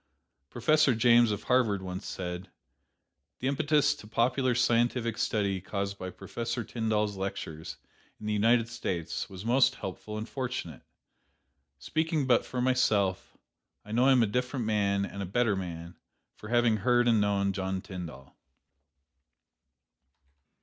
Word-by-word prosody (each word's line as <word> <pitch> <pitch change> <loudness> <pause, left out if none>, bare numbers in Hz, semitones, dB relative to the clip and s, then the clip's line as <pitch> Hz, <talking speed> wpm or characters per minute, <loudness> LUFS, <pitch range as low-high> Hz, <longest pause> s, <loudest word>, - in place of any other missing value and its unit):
Professor 140 +2 +3
James 120 0 +5
of 105 -2 -3
Harvard 115 -7 +2
once 90 0 -6
said: 90 0 -5 0.9
"The 130 - -3
impetus 145 +1 +2
to 105 - -13
popular 125 +3 +1
scientific 120 -1 +1
study 100 -5 0
caused 100 +1 -4
by 95 - -5
Professor 115 +5 -4
Tyndall's 105 -2 -1
lectures 80 -5 -5 0.4
in 105 - -9
the 105 - 0
United 115 +2 +3
States 90 -9 -4
was 95 +1 -9
most 130 +3 +4
helpful 105 +3 -6
and 110 +2 -5
fortunate. 130 -1 -5 1.0
Speaking 160 -2 -1
but 125 -2 +3
for 125 - -3
myself, 105 -7 +1 0.5
I 105 - -10
know 120 +3 +3
I - - +6
am 125 -3 +5
a - - +4
different 125 +3 -2
man 100 -2 +1
and 100 - -7
a - - -2
better 110 +1 +1
man, 85 -2 -6 0.4
for 105 - -11
having 120 -2 +3
heard 120 +3 +3
and 115 -3 +4
known 100 -1 +1
John 95 0 -2
Tyndall." 90 -8 -9
110 Hz, 140 wpm, -29 LUFS, 100-120 Hz, 1.0 s, I